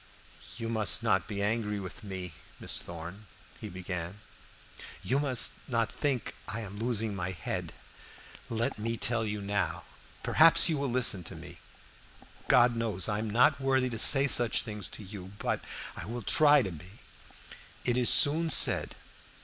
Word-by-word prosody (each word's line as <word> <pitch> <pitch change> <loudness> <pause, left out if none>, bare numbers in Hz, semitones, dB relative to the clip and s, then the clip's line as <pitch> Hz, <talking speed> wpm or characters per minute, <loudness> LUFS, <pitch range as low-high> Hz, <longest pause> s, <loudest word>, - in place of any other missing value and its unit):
"You 115 -1 -5
must 115 0 +3
not 100 -4 0
be 100 -1 -5
angry 105 -1 -2
with 95 +5 -10
me, 95 -4 -8 0.3
Miss - - -1
Thorn," 85 +5 -10 0.3
he 110 - -8
began, 90 0 -7 0.8
"you 130 +9 0
must 135 -3 0
not 115 -3 -1
think 135 -6 -3
I 110 +2 -4
am 100 -1 -9
losing 115 -3 -2
my 95 -1 -4
head. 90 -3 -6 0.8
Let 115 -1 -3
me 115 +2 -3
tell 120 0 -1
you 105 -1 -5
now 100 0 -3 0.4
perhaps 165 +2 +5
you 155 -3 -1
will 140 -1 -3
listen 120 -7 +1
to - - -9
me. - - -13 0.9
God 120 0 +4
knows, 110 -6 -2
I 105 -1 -2
am 110 0 -4
not 125 +6 +2
worthy 130 -1 0
to 115 - -2
say 135 +4 +8
such 120 -4 +3
things 105 -3 -7
to 110 - -11
you, 95 -1 -11
but - - -3 0.3
I - - -7
will 120 +2 -7
try 150 +4 +4
to 95 - -5
be. 90 +5 -14 0.8
It 120 - 0
is 125 -1 +3
soon 160 +3 +6
said. - - +3
110 Hz, 165 wpm, -28 LUFS, 100-125 Hz, 0.9 s, say